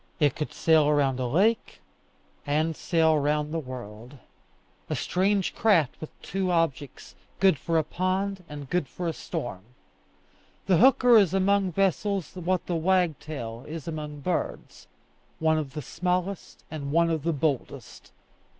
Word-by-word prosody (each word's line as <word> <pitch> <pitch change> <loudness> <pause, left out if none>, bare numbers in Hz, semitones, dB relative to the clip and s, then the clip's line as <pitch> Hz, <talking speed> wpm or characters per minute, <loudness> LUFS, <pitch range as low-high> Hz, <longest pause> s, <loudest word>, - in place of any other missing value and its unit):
It 145 -4 +3
could 150 - -4
sail 155 -2 +3
round 135 -3 +1
a 125 - -1
lake, 200 - +1 0.6
and 155 +2 0
sail 160 -2 +2
round 150 +1 0
the 165 - 0
world 125 -2 -9 0.7
a - - -1
strange 195 +1 0
craft 170 - +2
with 155 - -6
two 190 -1 -2
objects, 165 -5 -2 0.3
good 190 -7 +4
for 165 +3 0
a 160 - +3
pond 185 +4 -2
and 145 -2 -8
good 175 -1 -1
for 180 - -5
a 165 - -1
storm. 115 -10 -5 1.0
The 185 -3 +4
hooker 250 0 +6
is 195 -3 +2
among 195 -1 +2
vessels 195 -1 0
what 180 0 -1
the 175 - -2
wagtail 155 -9 -1
is 160 -1 -7
among 150 -2 -5
birds 180 +5 -4 0.5
one 160 0 +2
of 140 -4 -5
the 150 - -4
smallest 180 +6 -3
and 140 -3 -5
one 170 +2 +3
of 160 -2 -1
the 170 +3 0
boldest. 145 -3 -3
160 Hz, 150 wpm, -26 LUFS, 145-185 Hz, 1.0 s, hooker